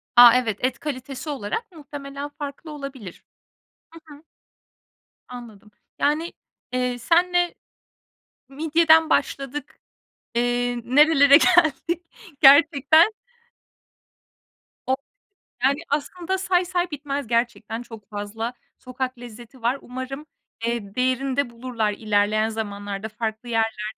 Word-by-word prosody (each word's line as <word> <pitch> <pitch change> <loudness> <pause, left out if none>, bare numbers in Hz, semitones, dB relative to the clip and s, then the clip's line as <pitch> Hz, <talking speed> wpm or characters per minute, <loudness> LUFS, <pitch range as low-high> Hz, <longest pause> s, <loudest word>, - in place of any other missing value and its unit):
A, 240 -1 +10
evet, 220 -5 -1
et 255 0 -1
kalitesi 275 0 -6
olarak 290 - -4
muhtemelen 285 -2 -8
farklı 290 +1 -8
olabilir. 275 - -9 0.7
Hı 330 - -11 0.2
hı. 295 - -19 1.0
Anladım. 225 -4 -11 0.3
Yani, 310 +4 0 0.4
eee, 250 -1 -1
senle 350 +4 +2 0.9
midyeden 320 +2 +3
başladık, 285 +2 -2 0.6
eee, 245 0 0
nerelere 285 +1 +6
geldik 340 0 +2 0.4
gerçekten 290 +6 +6 1.7
O 260 - +2 0.7
yani, 275 +3 +3
aslında 345 +6 -2
say 365 -1 +1
say 355 -1 -1
bitmez 280 -2 -4
gerçekten 235 -1 -1
çok 225 -3 -12
fazla 215 +3 -5 0.3
sokak 255 0 -5
lezzeti 240 +1 -12
var. 240 +4 +1
Umarım, 260 +3 -7 0.4
eee, 230 -4 -3
değerini 255 +1 0
de 280 -4 +1
bulurlar 235 -3 -2
ilerleyen 215 +1 +1
zamanlarda 205 -1 -5
farklı 220 +1 -5
yerlerde. 225 -2 -1
260 Hz, 105 wpm, -23 LUFS, 230-295 Hz, 1.7 s, A